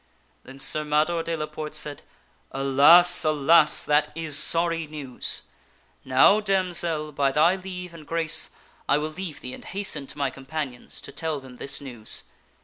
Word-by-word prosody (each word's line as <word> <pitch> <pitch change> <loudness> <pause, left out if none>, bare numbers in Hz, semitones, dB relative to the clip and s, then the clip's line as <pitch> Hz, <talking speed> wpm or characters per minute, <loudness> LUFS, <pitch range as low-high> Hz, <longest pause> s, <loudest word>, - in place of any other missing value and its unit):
Then 135 +1 -12
Sir 135 +3 +2
Mador 155 +3 0
de 165 0 -3
la 155 - -3
Porte 155 0 -8
said, 150 -1 -1 0.3
" - - -39
Alas! 165 +7 +6
alas! 155 +1 +4
that 150 0 +1
is 160 -3 +1
sorry 165 +1 +3
news! 145 -4 -5 0.6
Now, 130 +11 +4
damsel, 175 -6 -1
by 140 -1 0
thy 155 +6 +3
leave 180 -2 -8
and 155 -3 -13
grace, 165 -1 +1 0.4
I 145 - +4
will 155 +1 -3
leave 170 -2 -8
thee 125 - -7
and - - -11
hasten 190 -8 -2
to - - -10
my 140 -2 -1
companions 135 -2 -7
to - - -11
tell 160 -3 -4
them 130 -2 -14
this 140 - -2
news." 120 -6 -4
155 Hz, 165 wpm, -24 LUFS, 140-170 Hz, 0.6 s, Alas